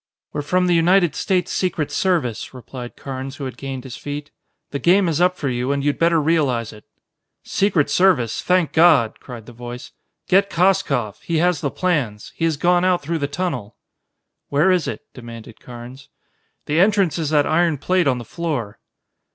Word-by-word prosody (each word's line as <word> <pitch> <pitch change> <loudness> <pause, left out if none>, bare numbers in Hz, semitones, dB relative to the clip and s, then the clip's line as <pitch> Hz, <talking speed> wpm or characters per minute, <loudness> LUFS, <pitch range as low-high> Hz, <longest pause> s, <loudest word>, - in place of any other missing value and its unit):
"We're 150 - -2
from 180 +5 +1
the 180 - +2
United 175 0 +4
States 185 -2 -1
Secret 170 -5 -1
Service," 155 - -1
replied 125 -1 -9
Carnes 135 0 -6
who 140 - -6
had 130 - -6
gained 135 -2 -6
his 130 -2 -8
feet. 145 0 -6 0.4
"The 140 - -3
game 185 +4 +4
is 165 0 0
up 180 0 +3
for 145 - -3
you, 125 +1 -1
and 140 -1 -1
you'd 145 - 0
better 165 0 +3
realize 145 -8 0
it." 105 - -15 0.6
"Secret 195 -7 +1
Service! 145 - +2
Thank 180 -3 +1
God!" 160 -9 +4
cried 120 -4 -10
the 120 - -12
voice. 120 +1 -8 0.4
"Get 195 +2 +3
Koskoff 165 - +1
he 170 -5 -2
has 175 -1 +2
the 140 - 0
plans. 135 - -2
He 165 - -1
has 160 -3 0
gone 175 +3 +3
out 180 -4 +2
through 165 +3 -2
the 140 - -1
tunnel!" 140 - -4 0.7
"Where 150 +7 +3
is 180 -4 +1
it?" - - -4
demanded 115 -2 -11
Carnes. 125 +2 -11 0.6
"The 150 +2 0
entrance 195 -3 +3
is 155 -3 -1
that 150 -2 +3
iron 165 -1 +2
plate 180 +3 +1
on 130 -2 +2
the 120 - -7
floor." 145 -12 -4
150 Hz, 185 wpm, -21 LUFS, 125-180 Hz, 0.7 s, United